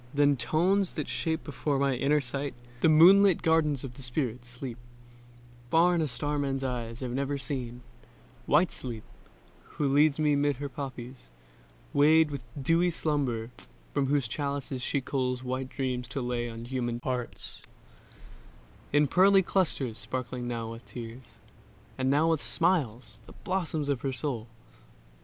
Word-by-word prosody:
Then 145 Hz, 0 st, +4 dB
tones 170 Hz, +10 st, +1 dB
that -, -, -3 dB
shape 160 Hz, -1 st, -2 dB
before 145 Hz, -1 st, -2 dB
my 140 Hz, 0 st, +2 dB
inner 145 Hz, +4 st, +2 dB
sight 140 Hz, +2 st, -3 dB, 0.2 s
The 160 Hz, -, +4 dB
moonlit 185 Hz, +4 st, +7 dB
gardens 155 Hz, -4 st, +2 dB
of 130 Hz, -3 st, -6 dB
the 135 Hz, -, -12 dB
spirit, 125 Hz, -2 st, -2 dB
Sleep, 125 Hz, 0 st, -7 dB, 0.9 s
Far 170 Hz, +4 st, +5 dB
on 170 Hz, -, +1 dB
a 155 Hz, -, +1 dB
star 145 Hz, +3 st, -2 dB
man's 135 Hz, -1 st, -1 dB
eyes 120 Hz, -2 st, -4 dB
have 125 Hz, -2 st, -3 dB
never 140 Hz, +2 st, -1 dB
seen: 125 Hz, -4 st, -4 dB, 0.7 s
White 165 Hz, +5 st, +4 dB
Sleep, 115 Hz, -4 st, -6 dB, 0.7 s
who 145 Hz, -, +1 dB
leads 145 Hz, +1 st, +4 dB
me 150 Hz, -2 st, +3 dB
'mid 145 Hz, 0 st, +2 dB
her 140 Hz, +1 st, -4 dB
poppies, 130 Hz, -, -7 dB, 0.6 s
weighed 155 Hz, +2 st, +5 dB
With 140 Hz, -4 st, -5 dB, 0.2 s
dewy 165 Hz, +6 st, +3 dB
slumber; 135 Hz, -8 st, -1 dB, 0.4 s
from 135 Hz, -, +1 dB
whose 140 Hz, -3 st, +1 dB
chalices 140 Hz, 0 st, -3 dB
She 140 Hz, +2 st, 0 dB
culls 130 Hz, -1 st, -2 dB
white 130 Hz, +1 st, -3 dB
dreams 130 Hz, -2 st, -3 dB
to 135 Hz, -, -4 dB
lay 120 Hz, -1 st, -2 dB
on 115 Hz, 0 st, -7 dB
human 120 Hz, -2 st, -2 dB
hearts 125 Hz, -2 st, -4 dB, 1.3 s
In 145 Hz, +1 st, +4 dB
pearly 190 Hz, +5 st, +5 dB
clusters 145 Hz, -, 0 dB
sparkling 125 Hz, +3 st, -4 dB
now 115 Hz, -2 st, -3 dB
with 115 Hz, +1 st, -9 dB
tears 120 Hz, +1 st, -9 dB, 0.6 s
And 130 Hz, 0 st, +1 dB
now 155 Hz, +4 st, +3 dB
with 160 Hz, -3 st, +1 dB
smiles; 145 Hz, -, 0 dB
the -, -, -12 dB
blossoms 170 Hz, -5 st, -1 dB
of 140 Hz, -4 st, 0 dB
her 135 Hz, -1 st, -2 dB
soul. 120 Hz, -3 st, -3 dB
135 Hz, 150 wpm, -29 LUFS, 125-150 Hz, 1.3 s, moonlit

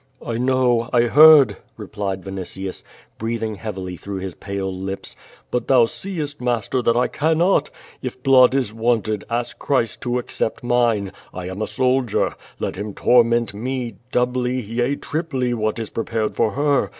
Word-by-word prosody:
"I 115 Hz, -1 st, -2 dB
know! 125 Hz, -2 st, +2 dB
I 120 Hz, -2 st, +4 dB
heard," 150 Hz, +3 st, +7 dB, 0.2 s
replied 100 Hz, -3 st, -4 dB
Vinitius, 95 Hz, 0 st, -6 dB, 0.4 s
breathing 115 Hz, -1 st, -2 dB
heavily 95 Hz, -4 st, -6 dB
through 100 Hz, +2 st, -6 dB
his 95 Hz, -1 st, -5 dB
pale 100 Hz, 0 st, -4 dB
lips. 95 Hz, +1 st, -5 dB, 0.4 s
"But 125 Hz, -, -1 dB
thou 125 Hz, -3 st, +6 dB
seest, 150 Hz, -1 st, -5 dB
master, 125 Hz, +1 st, 0 dB
that 115 Hz, 0 st, +2 dB
I 125 Hz, -, +3 dB
cannot! 160 Hz, 0 st, +2 dB, 0.3 s
If 130 Hz, -1 st, -6 dB
blood 130 Hz, -1 st, +6 dB
is 125 Hz, -6 st, 0 dB
wanted, 110 Hz, -2 st, 0 dB
ask 120 Hz, +1 st, -3 dB
Christ 125 Hz, -6 st, 0 dB
to 125 Hz, -1 st, -1 dB
accept 120 Hz, -2 st, -3 dB
mine. 120 Hz, -5 st, +1 dB, 0.2 s
I 90 Hz, 0 st, -5 dB
am 95 Hz, +3 st, -6 dB
a 110 Hz, -, -1 dB
soldier. 130 Hz, -2 st, +1 dB, 0.2 s
Let -, -, -3 dB
Him 105 Hz, 0 st, -5 dB
torment 120 Hz, -2 st, +3 dB
me, 120 Hz, 0 st, -4 dB
doubly, 125 Hz, +1 st, 0 dB
yea 120 Hz, +4 st, -1 dB
triply 140 Hz, -6 st, -2 dB
what 110 Hz, -1 st, -1 dB
is 115 Hz, -2 st, -5 dB
prepared 115 Hz, -1 st, -2 dB
for 110 Hz, -3 st, +1 dB
her! 145 Hz, 0 st, +1 dB
120 Hz, 155 wpm, -21 LUFS, 105-130 Hz, 0.4 s, heard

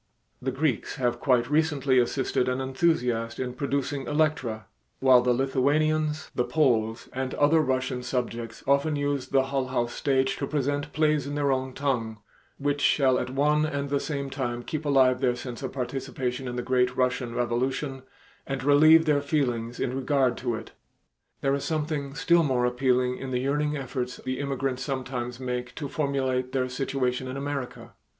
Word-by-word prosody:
The 130 Hz, -, -1 dB
Greeks 135 Hz, -2 st, -1 dB
have 120 Hz, -3 st, 0 dB
quite 125 Hz, -3 st, +2 dB
recently 145 Hz, -3 st, +2 dB
assisted 125 Hz, 0 st, 0 dB
an 125 Hz, +1 st, -1 dB
enthusiast 130 Hz, -5 st, 0 dB
in 125 Hz, -1 st, -3 dB
producing 140 Hz, 0 st, -2 dB
"Electra," 145 Hz, -8 st, 0 dB, 0.3 s
while 130 Hz, -2 st, +6 dB
the 125 Hz, 0 st, +2 dB
Lithuanians, 150 Hz, +4 st, +1 dB
the 125 Hz, -, +1 dB
Poles, 120 Hz, -5 st, +1 dB
and 130 Hz, 0 st, -3 dB
other 150 Hz, +3 st, +4 dB
Russian 130 Hz, -2 st, -1 dB
subjects 120 Hz, -2 st, -4 dB
often 140 Hz, +3 st, +2 dB
use 145 Hz, -2 st, -1 dB
the 135 Hz, -1 st, +3 dB
Hull 135 Hz, -1 st, -1 dB
House 120 Hz, -2 st, -1 dB
stage 135 Hz, -1 st, +1 dB
to 140 Hz, -, -3 dB
present 145 Hz, +1 st, -1 dB
plays 150 Hz, -2 st, +1 dB
in 145 Hz, -, -4 dB
their 145 Hz, -1 st, +1 dB
own 130 Hz, 0 st, -1 dB
tongue, 120 Hz, -6 st, -1 dB, 0.4 s
which 145 Hz, 0 st, -1 dB
shall 130 Hz, -4 st, +3 dB
at 125 Hz, -, -3 dB
one 150 Hz, +3 st, +2 dB
and 140 Hz, -2 st, -2 dB
the 140 Hz, -, +2 dB
same 140 Hz, -2 st, -4 dB
time 120 Hz, -3 st, -3 dB
keep 155 Hz, +3 st, -4 dB
alive 130 Hz, -2 st, +4 dB
their 125 Hz, -2 st, +2 dB
sense 125 Hz, 0 st, -7 dB
of 130 Hz, -, -4 dB
participation 130 Hz, -1 st, -3 dB
in 120 Hz, -, -4 dB
the 125 Hz, -, -2 dB
great 125 Hz, 0 st, +1 dB
Russian 125 Hz, -2 st, 0 dB
revolution 130 Hz, +3 st, -1 dB, 0.5 s
and 135 Hz, -1 st, -3 dB
relieve 155 Hz, +3 st, +6 dB
their 150 Hz, -2 st, +3 dB
feelings 125 Hz, -5 st, -1 dB
in 125 Hz, 0 st, -1 dB
regard 135 Hz, -2 st, +1 dB
to 120 Hz, -3 st, -2 dB
it. 110 Hz, 0 st, -8 dB, 0.7 s
There 135 Hz, -, +2 dB
is 140 Hz, -, -1 dB
something 150 Hz, -3 st, -2 dB
still 170 Hz, +2 st, +4 dB
more 130 Hz, -5 st, +1 dB
appealing 125 Hz, 0 st, +1 dB
in 135 Hz, -, -5 dB
the 125 Hz, -1 st, -1 dB
yearning 150 Hz, +2 st, 0 dB
efforts 125 Hz, -2 st, -4 dB
the 130 Hz, 0 st, -4 dB
immigrants 135 Hz, -2 st, -2 dB
sometimes 125 Hz, -3 st, -4 dB
make 125 Hz, -1 st, -4 dB
to 145 Hz, -, -4 dB
formulate 130 Hz, -3 st, -1 dB
their 130 Hz, -1 st, 0 dB
situation 130 Hz, 0 st, -1 dB
in 130 Hz, +1 st, -5 dB
America. 140 Hz, -2 st, -5 dB
135 Hz, 170 wpm, -27 LUFS, 125-145 Hz, 0.7 s, while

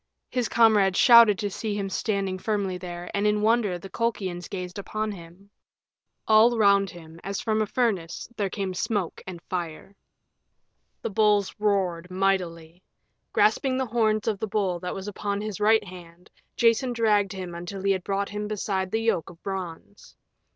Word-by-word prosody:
His 250 Hz, -3 st, -1 dB
comrades 210 Hz, -5 st, +4 dB
shouted 235 Hz, -4 st, +8 dB
to 205 Hz, 0 st, -3 dB
see 210 Hz, +1 st, -3 dB
him 200 Hz, -1 st, -2 dB
standing 195 Hz, -1 st, -2 dB
firmly 200 Hz, -3 st, -1 dB
there, 175 Hz, -1 st, -7 dB
and 205 Hz, +1 st, +1 dB
in 210 Hz, 0 st, +1 dB
wonder 215 Hz, -4 st, +2 dB
the 175 Hz, -, -10 dB
Colchians 190 Hz, -6 st, -3 dB
gazed 180 Hz, 0 st, -5 dB
upon 215 Hz, +2 st, -3 dB
him. 185 Hz, +2 st, -13 dB, 0.8 s
All 225 Hz, +2 st, +5 dB
round 200 Hz, -2 st, +4 dB
him, 165 Hz, -1 st, -12 dB
as 195 Hz, +1 st, -3 dB
from 220 Hz, -1 st, 0 dB
a 215 Hz, -, 0 dB
furnace, 200 Hz, -9 st, -1 dB
there 200 Hz, -3 st, -1 dB
came 195 Hz, -1 st, -3 dB
smoke 195 Hz, -2 st, -2 dB
and 180 Hz, -2 st, -7 dB
fire. 175 Hz, +2 st, -5 dB, 1.1 s
The -, -, -2 dB
bulls 210 Hz, -1 st, +2 dB
roared 185 Hz, -4 st, 0 dB
mightily. 180 Hz, -3 st, -1 dB, 0.5 s
Grasping 255 Hz, +5 st, +2 dB
the 260 Hz, -, 0 dB
horns 220 Hz, -2 st, +1 dB
of 210 Hz, -3 st, 0 dB
the 220 Hz, -, -2 dB
bull 195 Hz, -4 st, -1 dB
that 180 Hz, +1 st, -5 dB
was 195 Hz, +1 st, -6 dB
upon 205 Hz, 0 st, -3 dB
his 210 Hz, -2 st, -5 dB
right 220 Hz, +1 st, +4 dB
hand, 180 Hz, -2 st, -13 dB, 0.3 s
Jason 235 Hz, +2 st, +3 dB
dragged 210 Hz, -4 st, +2 dB
him 185 Hz, -2 st, -6 dB
until 175 Hz, +3 st, -6 dB
he 195 Hz, -, +3 dB
had 190 Hz, -2 st, -1 dB
brought 200 Hz, +1 st, -2 dB
him 210 Hz, 0 st, -4 dB
beside 195 Hz, -3 st, -2 dB
the 220 Hz, +3 st, -1 dB
yoke 205 Hz, -8 st, 0 dB
of 170 Hz, 0 st, -16 dB
bronze. 190 Hz, 0 st, -7 dB
200 Hz, 170 wpm, -26 LUFS, 185-215 Hz, 1.1 s, shouted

